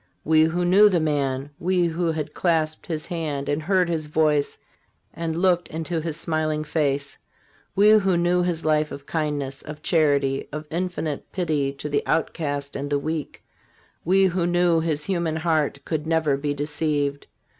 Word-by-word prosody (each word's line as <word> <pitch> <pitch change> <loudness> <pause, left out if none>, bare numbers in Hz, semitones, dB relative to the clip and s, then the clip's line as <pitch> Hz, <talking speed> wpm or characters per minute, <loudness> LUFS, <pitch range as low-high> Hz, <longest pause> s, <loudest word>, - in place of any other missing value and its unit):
We 155 0 +5
who 175 +2 0
knew 200 +4 +6
the 180 -3 +2
man, 140 -3 -1
we 180 0 +2
who 170 0 0
had 155 -1 -4
clasped 160 -3 0
his 155 -3 -3
hand 150 -5 -3
and 145 +2 0
heard 185 +2 +2
his 160 -3 -2
voice 150 -1 +1 0.6
and 165 -1 -3
looked 175 -1 +2
into 160 +1 -3
his 160 -1 -3
smiling 155 -2 -1
face; 145 -2 -1 0.6
we 205 +2 +6
who 195 -4 +4
knew 175 +1 +2
his 175 -3 -2
life 155 -1 +2
of 140 - -8
kindness, 145 -4 -2
of 150 0 -9
charity, 140 -4 +1
of 150 +1 -5
infinite 170 -4 -3
pity 155 -7 0
to 140 +2 -6
the 145 -1 0
outcast 145 -3 -1
and 140 +1 -4
the 145 - +1
weak; 155 +1 -4 0.6
we 190 +3 +4
who 180 -1 +1
knew 175 -1 +3
his 155 -2 -1
human 170 -3 -1
heart, 155 -3 0
could 155 -1 -3
never 160 -3 +2
be 145 +1 -2
deceived. 145 -1 -2
155 Hz, 165 wpm, -24 LUFS, 145-170 Hz, 0.6 s, knew